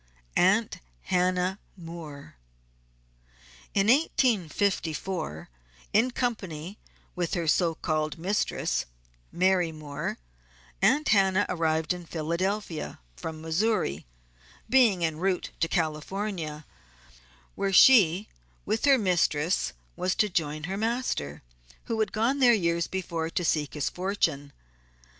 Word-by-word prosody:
"AUNT 205 +5 +3 0.3
HANNAH 185 +1 +1 0.2
MOORE." 165 -4 -9 1.4
In 195 - +3
1854 190 - 0 0.5
in 225 +5 +4
company 200 -8 -4 0.4
with 175 -2 -1
her 170 -2 -2
so 165 +1 +2
called 155 -2 -2
Mistress 190 +5 -1 0.5
(Mary 180 -2 +2
Moore) 150 -2 -5 0.6
Aunt 300 +2 +3
Hannah 195 -1 +4
arrived 160 -2 0
in 175 -1 -9
Philadelphia, 170 +2 -3 0.2
from 155 - -7
Missouri, 160 - 0 0.6
being 225 -10 +4
en 160 -1 -2
route 185 0 -1
to 165 - +2
California, 160 -1 -3 0.9
where 195 0 -1
she 195 -3 +6 0.4
with 215 +4 0
her 275 -2 +6
mistress 175 -5 +1 0.2
was 180 +1 -1
to 210 - +2
join 155 -4 -2
her 190 +5 -3
master, 220 - -2 0.4
who 225 -1 -3
had 215 -3 +1
gone 235 +6 +1
there 245 -3 +6
years 170 -5 +1
before 170 -4 -3
to 175 +1 -2
seek 150 -2 0
his 150 - -1
fortune. 170 -7 -1
180 Hz, 110 wpm, -27 LUFS, 160-205 Hz, 1.4 s, she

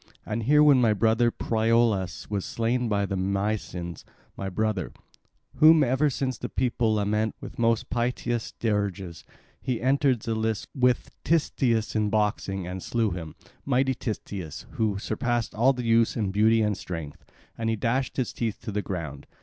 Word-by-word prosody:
And 110 +1 -2
here, 150 +6 +5
when 140 -4 +6
my 115 -3 +4
brother 115 +3 +3
Priolas 110 -5 +1
was 100 -2 -2
slain 120 +1 -1
by 100 -1 +1
the 100 - -3
Mysians—my 95 -2 -4
brother, 105 -1 -1 0.6
whom 155 0 +7
ever 135 +3 +2
since 130 -2 -2
the - - -4
people 120 -3 +1
lament 105 +1 0
with - - -9
most 115 -1 +1
piteous 120 -1 -1
dirges—he 100 +3 -4
entered 135 -2 +2
the 115 - -2
lists 110 -1 -1
with 125 -2 +1
Titias 125 -9 +1
in 105 -1 +1
boxing 100 -3 0
and 90 +1 -5
slew 115 -1 0
him, 80 -3 -6 0.3
mighty 130 0 +2
Titias, 100 - -5
who 105 -3 0
surpassed 115 +3 -1
all 120 +5 +4
the 125 -2 -4
youths 115 0 +3
in 105 -4 0
beauty 110 +2 +4
and 105 -1 +1
strength; 80 -5 -7 0.3
and 115 0 -2
he 115 - +1
dashed 125 +5 -1
his 130 - -1
teeth 115 -3 -2
to - - -5
the 105 +1 -1
ground. 80 -8 -6
110 Hz, 160 wpm, -26 LUFS, 100-120 Hz, 0.6 s, whom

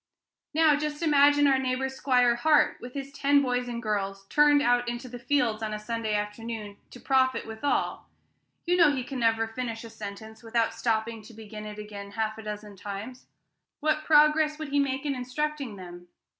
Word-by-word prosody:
Now, 315 -2 +5
just 300 +2 -3
imagine 290 -1 +5
our 270 -2 +4
neighbor, 260 0 -1
'Squire 250 -2 +2
Hart, 300 +4 +3
with 245 +2 -9
his 275 0 -5
ten 280 0 +3
boys 250 -1 -1
and 240 0 -5
girls, 195 -2 -2
turned 295 -1 +5
out 245 -2 +2
into 240 +2 -5
the 245 0 -8
fields 240 -4 0
on 215 -1 -3
a - - -3
Sunday 220 0 -3
afternoon 210 0 -5
to 245 - -12
profit 260 0 +1
withal: 225 +6 -2 0.6
you 355 0 +2
know 330 -4 +6
he 260 -3 -2
can 260 +1 -6
never 225 -1 +2
finish 225 0 -5
a 230 - -10
sentence 220 0 -9
without 230 0 0
stopping 225 -1 -1
to 220 +1 -14
begin 215 -1 -9
it 210 0 -8
again 205 -1 -8
half 220 0 -1
a - - -6
dozen 210 -1 -7
times. 205 +6 -8 0.5
What 310 0 0
progress 300 0 +4
would 310 -2 -6
he 285 +1 +1
make 270 0 -1
in 285 - 0
instructing 270 -1 -3
them? 175 -2 -11
245 Hz, 185 wpm, -27 LUFS, 220-280 Hz, 0.6 s, know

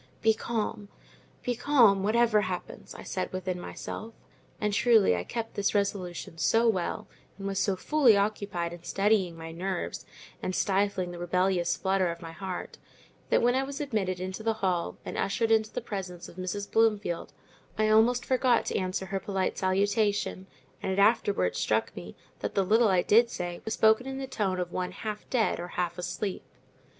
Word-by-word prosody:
"Be 220 0 +5
calm, 215 -2 -3 0.5
be 245 - 0
calm, 235 -6 +4
whatever 215 +1 +3
happens," - - -6
I - - -9
said - - -3
within 185 -1 -3
myself; 220 +5 -7 0.4
and 210 -2 0
truly 220 - +5
I 90 - -2
kept 225 - -5
this 205 +1 0
resolution 180 -5 -2
so 230 +7 +3
well, 190 -6 0 0.3
and 195 - -7
was 195 -1 -1
so 195 -1 +1
fully 250 +1 +4
occupied 200 -4 -1
in 175 - -10
steadying 195 -4 +1
my 165 0 -7
nerves 180 +2 -3 0.4
and 185 - -2
stifling 195 -2 +1
the 175 - -8
rebellious 175 0 +1
flutter 190 -1 +1
of 170 0 -5
my 165 -1 -8
heart, 185 +1 -6 0.5
that - - +3
when 245 +1 +4
I 260 - +2
was 275 +1 -5
admitted 210 -11 -1
into 185 +3 -5
the 225 0 0
hall 175 -2 0
and - - -4
ushered 225 +3 0
into 220 -1 +3
the - - -3
presence 180 -4 -6
of - - -13
Mrs. 185 +2 -4
Bloomfield, 210 -6 +1 0.5
I 215 0 +2
almost 230 +3 +4
forgot 255 -2 +2
to - - -1
answer 185 0 -2
her 195 +1 -2
polite 190 -1 -2
salutation; 200 0 +1 0.3
and 190 - -2
it 190 - -2
afterwards 200 - +3
struck - - 0
me, - - -8 0.2
that - - -4
the 195 - +2
little 225 +4 +4
I 185 -3 +3
did 230 +3 +5
say 175 -4 -5
was 220 - -2
spoken 220 +4 +4
in 265 0 -4
the 270 - -3
tone 205 -8 -1
of 175 -1 -3
one 180 0 -3
half 215 -1 -6
dead 235 -4 +1
or 175 - -4
half 175 0 -1
asleep. 190 +2 -3
200 Hz, 180 wpm, -28 LUFS, 185-220 Hz, 0.5 s, Be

